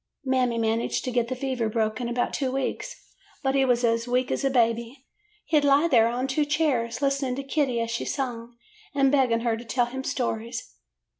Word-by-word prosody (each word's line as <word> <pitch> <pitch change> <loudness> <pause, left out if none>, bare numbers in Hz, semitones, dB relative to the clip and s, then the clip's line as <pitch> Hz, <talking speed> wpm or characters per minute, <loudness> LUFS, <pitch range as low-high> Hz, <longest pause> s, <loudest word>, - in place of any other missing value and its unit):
"Mammy 255 -3 +1
managed 225 0 0
to 255 - -2
get 240 -1 +1
the 255 - -3
fever 255 -3 -2
broke 215 0 -1
in 240 - -2
about 245 0 -1
two 265 -3 -1
weeks, 270 - -3 0.5
but 270 0 +1
he 275 -1 +3
was 245 -1 +2
as 230 0 +1
weak 250 +1 0
as - - -1
a 275 - +3
baby. 235 +1 0 0.4
He 310 - +3
'd - - -4
lie 285 +3 +4
there 230 -7 +5
on 245 +2 -1
two 270 +3 +1
chairs, 285 -5 0
listening 275 -2 0
to 275 - -4
Kitty 270 -3 0
as 230 0 -2
she 235 - -2
sung, 240 -3 -4 0.4
and 275 -1 +4
begging 255 -5 +3
her 230 -1 +1
to 230 - -8
tell 245 +1 +1
him 265 +2 -6
stories. 235 -2 -3
250 Hz, 210 wpm, -26 LUFS, 235-270 Hz, 0.5 s, there